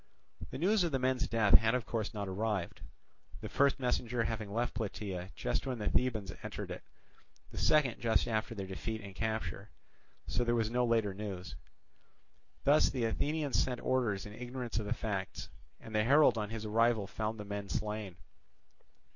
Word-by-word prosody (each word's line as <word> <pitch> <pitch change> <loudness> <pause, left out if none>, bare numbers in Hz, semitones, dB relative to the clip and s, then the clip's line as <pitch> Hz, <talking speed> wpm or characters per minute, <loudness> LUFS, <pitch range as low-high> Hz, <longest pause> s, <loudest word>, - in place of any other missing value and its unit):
The - - -6
news 195 +6 +3
of 170 - 0
the 135 - +2
men's 130 +2 +1
death 110 -3 +2
had 110 +2 +2
of 125 -3 -1
course 110 -3 -2
not 100 -2 -4
arrived; 100 -1 -2 0.6
the - - -6
first 140 -1 +3
messenger 125 -2 0
having 110 -2 -3
left 120 +3 0
Plataea 100 -5 -4
just - - -1
when 130 -2 -1
the 105 -2 -1
Thebans 110 -6 +1
entered - - -5
it, - - -5 0.7
the - - -5
second 150 -6 +3
just 115 -2 +2
after 110 +1 -1
their 100 -2 -4
defeat 110 +4 -4
and 100 -1 -9
capture; 105 -2 -3 0.6
so 120 - 0
there 120 0 +2
was 110 -1 +1
no 125 0 +2
later 115 -4 +2
news. 95 - -6 1.1
Thus 145 +2 +5
the 125 -4 -1
Athenians 145 +5 +1
sent 125 -2 -1
orders 115 -7 +1
in 105 - -8
ignorance 125 -1 -4
of 105 - -4
the - - +1
facts; 100 -3 -3 0.3
and 110 - -11
the 105 0 +3
herald 145 +5 +6
on 105 -2 -2
his 110 -1 -5
arrival 115 0 +3
found 110 +2 -3
the 105 - -5
men 100 0 -5
slain. 105 0 -3
110 Hz, 180 wpm, -33 LUFS, 105-125 Hz, 1.1 s, herald